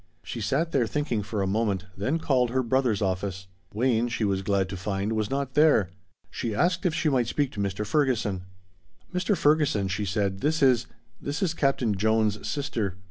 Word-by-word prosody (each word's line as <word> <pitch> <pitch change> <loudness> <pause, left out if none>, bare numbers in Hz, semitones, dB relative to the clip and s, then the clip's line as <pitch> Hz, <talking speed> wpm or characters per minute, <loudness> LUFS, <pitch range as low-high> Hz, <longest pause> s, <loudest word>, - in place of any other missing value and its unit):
She 115 - -6
sat 150 +9 0
there 125 -5 +2
thinking 135 -5 -1
for 105 0 -2
a - - 0
moment, 100 -2 0
then 130 +12 0
called 130 -6 +1
her 130 +2 0
brother's 120 -4 +1
office. 95 0 -2 0.3
Wayne, 120 +1 +1
she 120 -1 -2
was 100 -2 +1
glad 100 -1 +1
to 95 - -5
find, 100 +3 -2
was 110 -2 -1
not 135 -1 -2
there. 150 - +4 0.4
She 115 -3 -3
asked 180 - +2
if 165 - -1
she 160 - 0
might 130 -5 +2
speak 140 +2 0
to - - -8
Mr. 100 +1 -2
Ferguson. 115 -6 +1 0.7
"Mr. 180 +2 +1
Ferguson," 145 -10 +2
she 100 +2 -2
said, 100 -1 -1
"this 155 +1 +1
is 125 -3 +4 0.3
this 145 +4 -2
is 170 -4 +1
Captain 135 -8 +1
Jones' 110 +1 +1
sister. 110 -10 -2
115 Hz, 190 wpm, -26 LUFS, 100-140 Hz, 0.7 s, there